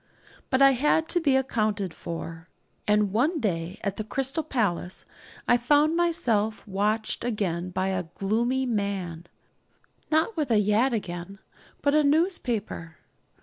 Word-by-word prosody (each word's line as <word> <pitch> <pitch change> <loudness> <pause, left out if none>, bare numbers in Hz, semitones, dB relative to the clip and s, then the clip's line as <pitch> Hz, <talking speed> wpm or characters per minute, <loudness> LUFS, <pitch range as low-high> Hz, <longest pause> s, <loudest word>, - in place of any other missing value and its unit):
But 260 +1 +4
I 275 - +8
had 300 +5 +2
to 350 - +3
be 280 -4 +3
accounted 215 -8 0
for, 165 0 -7 0.4
and 210 -2 +3
one 300 +9 +2
day 180 - -2
at 200 -1 -2
the 215 - -2
Crystal 270 +8 -1
Palace 205 - -2 0.4
I 240 - +5
found 295 +6 +3
myself 230 -13 +1
watched 210 +3 -1
again 185 -7 -1
by 185 +1 -1
a 185 -2 -1
'gloomy 230 +9 0
man' 195 -7 -2 0.8
not 320 +8 +2
with 305 -5 -1
a 225 - +4
yataghan, 205 -4 0 0.5
but 285 - +3
a 305 0 +4
newspaper. 255 - 0
215 Hz, 135 wpm, -26 LUFS, 190-270 Hz, 0.8 s, I